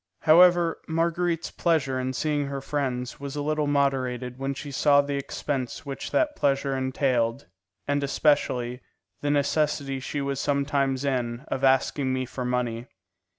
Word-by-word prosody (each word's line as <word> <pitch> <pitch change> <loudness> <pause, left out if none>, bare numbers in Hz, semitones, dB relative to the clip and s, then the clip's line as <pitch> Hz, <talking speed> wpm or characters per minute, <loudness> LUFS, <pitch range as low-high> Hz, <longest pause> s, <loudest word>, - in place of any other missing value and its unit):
However, 175 +1 +5
Marguerite's 170 +1 0
pleasure 145 -6 +1
in 130 0 -2
seeing 145 +1 -1
her 140 0 -4
friends 130 -3 -3
was 140 0 -6
a 145 - -2
little 155 0 0
moderated 130 -3 0
when 135 0 -2
she 145 +1 -7
saw 145 +1 +4
the 140 0 0
expense 140 -1 -3
which 140 -1 -5
that 300 -2 +1
pleasure 135 -1 +1
entailed, 130 -2 0 0.4
and 145 0 +1
especially 125 -4 +1 0.4
the 145 - -1
necessity 145 -1 0
she 145 +3 -4
was 140 -1 -2
sometimes 140 -1 0
in 125 -2 -2
of 135 - -3
asking 135 0 +2
me 130 0 -1
for 125 +1 -6
money. 125 -1 -2
140 Hz, 150 wpm, -26 LUFS, 130-145 Hz, 0.4 s, However